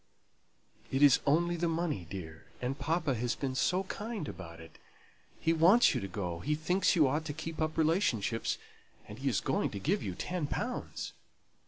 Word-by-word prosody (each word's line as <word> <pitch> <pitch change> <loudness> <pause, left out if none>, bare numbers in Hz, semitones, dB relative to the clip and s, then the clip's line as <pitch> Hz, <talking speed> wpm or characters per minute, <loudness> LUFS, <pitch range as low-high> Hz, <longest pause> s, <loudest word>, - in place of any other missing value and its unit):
"It 135 +2 +2
is 140 -3 +7
only 170 +4 +3
the 170 +1 0
money, 160 - -1
dear. 80 -4 -8
And 130 +3 -3
papa 160 0 0
has 120 0 -1
been 135 -2 -2
so 180 +8 +1
kind 205 -3 -5
about 85 -3 -8
it. 80 0 -13 0.6
He 165 - +2
wants 180 +9 +6
you - - -1
to 100 - -3
go; 90 -3 -4
he 150 - 0
thinks 180 +6 +2
you 155 -5 +5
ought 150 +4 0
to 145 - -3
keep 160 +1 -5
up 155 0 -1
relationships; 155 - +1 0.5
and - - -9
he - - 0
is - - +1
going - - 0
to 100 - -6
give 185 - +1
you 95 -3 -4
ten 175 - -2
pounds." 245 - -4
150 Hz, 185 wpm, -32 LUFS, 115-170 Hz, 0.6 s, is